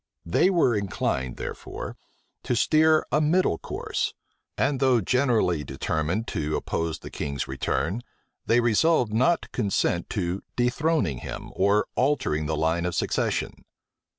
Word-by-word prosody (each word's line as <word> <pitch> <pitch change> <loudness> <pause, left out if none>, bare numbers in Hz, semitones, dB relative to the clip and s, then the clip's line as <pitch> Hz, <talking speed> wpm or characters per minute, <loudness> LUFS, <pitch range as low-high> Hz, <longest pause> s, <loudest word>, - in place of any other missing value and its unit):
They 85 - +3
were 165 - +3
inclined, 75 -10 -2
therefore, - - -6 0.5
to 125 - -1
steer 155 +5 +4
a 150 - +3
middle 155 - +2
course; - - -3 0.4
and, 135 0 +1
though 130 -3 +4
generally 110 - +1
determined 80 - -2
to 75 0 -2
oppose 80 -1 -2
the - - -10
king's 70 -3 -3
return, 80 - -1 0.5
they 120 +1 +4
resolved 120 +1 +3
not 130 +10 +3
to - - -12
consent 95 -3 0
to 95 -2 -2
dethroning 125 - +1
him, - - -7
or 100 +2 +3
altering 125 - +1
the 80 0 -1
line 80 +3 +1
of 90 - -3
succession. - - -1
105 Hz, 135 wpm, -26 LUFS, 80-130 Hz, 0.5 s, steer